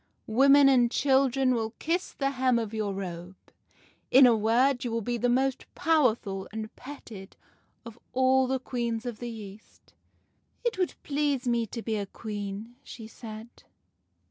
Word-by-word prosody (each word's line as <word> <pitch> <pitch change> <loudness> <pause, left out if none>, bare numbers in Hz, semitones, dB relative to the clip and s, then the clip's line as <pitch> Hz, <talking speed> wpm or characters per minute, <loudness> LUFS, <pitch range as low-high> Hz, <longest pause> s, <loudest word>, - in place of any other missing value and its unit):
Women 275 +5 +5
and 250 -3 +4
children 265 -1 +2
will 225 -1 -2
kiss 345 +3 -2
the 275 -1 -1
hem 255 -2 +2
of 225 -2 -3
your 215 -2 -2
robe. 180 -1 -6 0.7
In 265 +1 +8
a 240 -2 +6
word, 245 +5 +2
you 245 - -2
will 230 -1 -2
be 240 +3 -2
the 245 - +1
most 265 +2 0
powerful 230 -11 +1
and 220 +1 -6
petted 230 -8 -11 0.5
of 230 0 -11
all 260 0 +3
the 265 +1 0
queens 235 -2 -3
of 240 -3 -5
the 240 - -5
East.' 215 -2 -12 0.2
" - - -44
' - - -39
It 465 -5 -1
would 365 - 0
please 285 -3 -1
me 235 -1 +1
to 230 +1 -7
be 220 -2 -2
a 200 -1 -4
Queen,' 210 +2 -7
she 225 - -10
said. 220 0 -10
240 Hz, 170 wpm, -28 LUFS, 220-265 Hz, 0.7 s, In